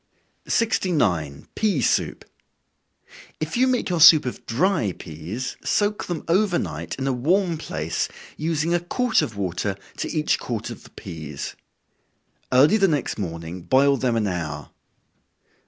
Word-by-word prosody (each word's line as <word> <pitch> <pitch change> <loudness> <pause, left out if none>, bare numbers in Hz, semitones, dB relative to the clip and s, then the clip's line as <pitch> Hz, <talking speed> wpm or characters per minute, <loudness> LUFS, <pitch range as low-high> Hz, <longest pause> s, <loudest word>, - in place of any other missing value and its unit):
69. 145 - 0
Pea 205 -9 +1
Soup. 120 - 0 1.1
If 155 0 -3
you 255 +2 +4
make 255 -1 +1
your 175 -2 0
soup 155 -2 +9
of 125 - -5
dry 120 - +1
peas, 85 +13 -6
soak 205 0 0
them 175 -3 -4
over 180 +1 +3
night, - - -4
in 135 - -3
a 135 - +1
warm 170 +8 +1
place, 80 - -2 0.3
using 160 +1 0
a 175 - +3
quart 230 +8 +1
of 110 - -4
water 95 +1 -2 0.2
to - - -3
each 155 -2 +1
quart 115 -1 -4
of 115 - -9
the - - -14
peas. 80 -6 -7 1.0
Early 145 +11 +6
the 195 -2 +4
next 150 -8 -1
morning 85 -1 -5
boil 140 +8 +4
them 125 -2 0
an 110 -2 +1
hour. 80 -7 -4
135 Hz, 145 wpm, -23 LUFS, -, 1.1 s, soup